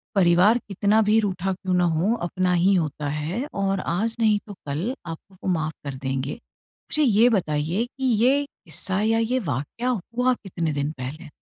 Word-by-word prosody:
परिवार 185 Hz, +4 st, +5 dB
कितना 205 Hz, +2 st, +2 dB
भी 220 Hz, +1 st, +5 dB
रूठा 190 Hz, -2 st, -1 dB
क्यों 185 Hz, 0 st, -3 dB
ना 180 Hz, 0 st, +3 dB
हो, 175 Hz, +5 st, +2 dB
अपना 180 Hz, -2 st, -1 dB
ही 180 Hz, +3 st, +4 dB
होता 150 Hz, -4 st, -1 dB
है 155 Hz, -, -2 dB
और 195 Hz, -1 st, 0 dB
आज 210 Hz, +7 st, -1 dB
नहीं 215 Hz, -2 st, +3 dB
तो 205 Hz, -, -7 dB
कल 160 Hz, -, -2 dB
आपको 170 Hz, +3 st, -9 dB
वो -, -, -1 dB
माफ़ 160 Hz, -2 st, -2 dB
कर 140 Hz, -2 st, -4 dB
देंगे। 135 Hz, +1 st, -2 dB
मुझे 300 Hz, +5 st, -4 dB
ये 230 Hz, -2 st, +5 dB
बताइए 175 Hz, 0 st, 0 dB
कि 265 Hz, +2 st, -10 dB, 0.2 s
ये 275 Hz, +3 st, +4 dB
किस्सा 185 Hz, -, -3 dB
या 225 Hz, +1 st, +2 dB
ये 240 Hz, +3 st, +1 dB
वाकया 145 Hz, -, -3 dB
हुआ 245 Hz, +3 st, 0 dB
कितने 170 Hz, -8 st, -3 dB
दिन 145 Hz, +1 st, -1 dB
पहले? 150 Hz, +6 st, -7 dB
185 Hz, 180 wpm, -24 LUFS, 160-225 Hz, 0.2 s, परिवार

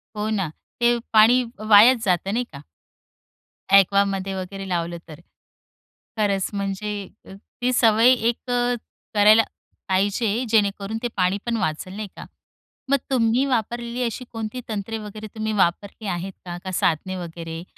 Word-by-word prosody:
हो 210 Hz, +1 st, -2 dB
ना, 200 Hz, -5 st, 0 dB, 0.3 s
ते 240 Hz, 0 st, +3 dB, 0.2 s
पाणी 230 Hz, +4 st, +6 dB, 0.3 s
वायाच 225 Hz, +3 st, +7 dB
जातं 185 Hz, +1 st, +1 dB
नाही 245 Hz, +2 st, +1 dB
का? 140 Hz, -, -9 dB, 1.1 s
ॲक्वामध्ये 195 Hz, 0 st, +4 dB
वगैरे 190 Hz, +1 st, -6 dB
लावलं 170 Hz, -1 st, -2 dB
तर. 155 Hz, -2 st, -11 dB, 1.0 s
खरंच 200 Hz, -3 st, +1 dB
म्हणजे 200 Hz, 0 st, -3 dB, 0.3 s
ती 245 Hz, +5 st, -4 dB
सवय 230 Hz, 0 st, +5 dB, 0.2 s
1 235 Hz, -, 0 dB
करायला 225 Hz, -3 st, +2 dB, 0.5 s
पाहिजे 205 Hz, +5 st, +1 dB
जेणेकरून 205 Hz, -1 st, +1 dB
ते -, -, +1 dB
पाणी 185 Hz, +1 st, +2 dB
पण 235 Hz, -1 st, -1 dB
वाचेलं 185 Hz, 0 st, -3 dB
नाही 215 Hz, -1 st, -4 dB
का. -, -, -9 dB, 0.6 s
मग 280 Hz, -, +4 dB
तुम्ही 240 Hz, +1 st, +2 dB
वापरलेली 240 Hz, -1 st, -2 dB
अशी 240 Hz, +1 st, -3 dB
कोणती 225 Hz, +2 st, -5 dB
तंत्रे 220 Hz, +1 st, -3 dB
वगैरे, 215 Hz, 0 st, -8 dB
तुम्ही 220 Hz, 0 st, -2 dB
वापरली 200 Hz, +2 st, 0 dB
आहेत 185 Hz, +1 st, -3 dB
का? 175 Hz, -1 st, -5 dB
का 190 Hz, -, -5 dB
साधने 180 Hz, +1 st, 0 dB
वगैरे? 165 Hz, -1 st, -7 dB
210 Hz, 135 wpm, -23 LUFS, 190-230 Hz, 1.1 s, वायाच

